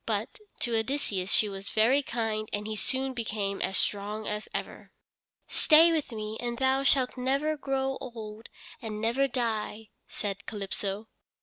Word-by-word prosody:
But, 215 - -1 0.2
to 235 -1 +1
Odysseus 220 -5 0
she 215 - +4
was 195 0 -6
very 240 +6 +4
kind 220 -4 -2
and 205 0 -2
he 215 0 -3
soon 265 +4 -1
became 210 -4 -2
as 190 - +1
strong 210 +1 -1
as 210 0 -3
ever. - - -5 0.6
"Stay 325 +2 +6
with 310 -5 0
me, 215 -1 -4
and 240 -1 -2
thou 265 +1 +3
shalt 265 -2 +3
never 275 +5 +1
grow 270 -2 -1
old 225 -3 -7 0.3
and 215 -3 -4
never 235 +5 +2
die," 225 -3 -2 0.2
said 200 -1 -4
Calypso. 205 0 -3
225 Hz, 150 wpm, -29 LUFS, 210-265 Hz, 0.6 s, Stay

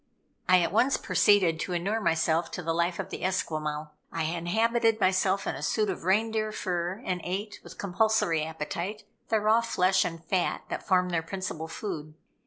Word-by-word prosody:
I 185 -1 +7
at 170 - 0
once 250 +7 +3
proceeded 185 -6 +3
to 180 - -3
inure 200 +6 -1
myself 165 -2 +1
to 180 - -4
the 165 0 0
life 170 +1 0
of - - -5
the - - -6
Esquimaux. 155 -5 -2 0.2
I 165 - -2
habited 220 +8 +1
myself 190 0 +2
in - - -1
a - - -7
suit 215 -3 +1
of 175 - -7
reindeer 215 +3 +1
fur, 180 +2 -3
and 180 -1 -1
ate, 200 +4 -4
with - - -12
compulsory 195 -4 +1
appetite, 170 +6 -4 0.3
the 220 - +3
raw 215 +2 +4
flesh 190 -5 +2
and 165 -1 -5
fat 180 +1 0
that - - -5
form 180 -1 +3
their 170 -2 0
principal 165 -2 -5
food. 160 -4 -6
185 Hz, 180 wpm, -28 LUFS, 165-210 Hz, 0.3 s, I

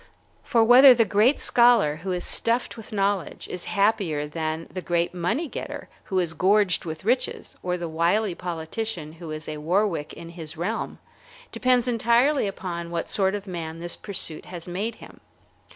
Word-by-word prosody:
For 230 -1 +3
whether 250 +3 +9
the 230 -1 +4
great 215 +7 +3
scholar 235 -12 +4
who 185 +4 -5
is 180 -1 -2
stuffed 235 +2 0
with 225 -2 -11
knowledge 200 -2 -1
is 180 - -5
happier 195 -8 +1
than 160 +1 -4
the 185 - -4
great 175 0 0
money 180 - -1
getter - - -7 0.2
who 190 - -2
is 175 -3 +1
gorged 190 +1 +2
with 160 +1 -6
riches, 250 +3 -1
or 180 0 -1
the 170 -1 -4
wily 175 +6 +1
politician 170 0 -4
who 165 0 -10
is 155 0 -6
a 155 - -4
Warwick 170 0 0
in 165 0 -10
his 165 -2 -8
realm, 200 +7 -3 0.5
depends 250 -1 +2
entirely 240 +3 +3
upon 175 -3 -5
what 170 -1 -3
sort 190 0 +1
of 205 -1 -6
a 190 - -8
man 165 -2 -5
this 175 0 -4
pursuit 175 -6 -3
has 175 -1 -8
made 200 +6 -3
him. - - -14
180 Hz, 175 wpm, -25 LUFS, 165-220 Hz, 0.5 s, whether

